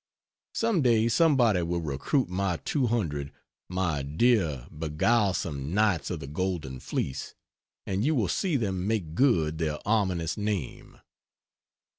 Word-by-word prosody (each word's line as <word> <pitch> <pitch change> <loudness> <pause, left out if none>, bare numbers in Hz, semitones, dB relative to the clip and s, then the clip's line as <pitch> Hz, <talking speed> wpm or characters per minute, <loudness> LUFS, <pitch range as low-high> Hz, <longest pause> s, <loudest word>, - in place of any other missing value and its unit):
Some 225 -7 +1
day 115 -3 +3
somebody 120 - +4
will 85 +1 -1
recruit 80 - 0
my 90 -1 -1
200 105 - -1 0.4
my 90 -5 -1
dear 80 - +1
beguilesome 80 - 0
Knights 105 -8 +2
of - - -3
the - - -6
Golden 75 -4 -3
Fleece 65 - -4 0.5
and 95 +2 -1
you 155 +4 +2
will 110 -7 +1
see 175 - 0
them 95 -6 -1
make 100 -8 -1
good 80 - +2
their 75 -2 -1
ominous 95 -7 +1
name. 105 - -4
95 Hz, 125 wpm, -28 LUFS, 80-115 Hz, 0.5 s, somebody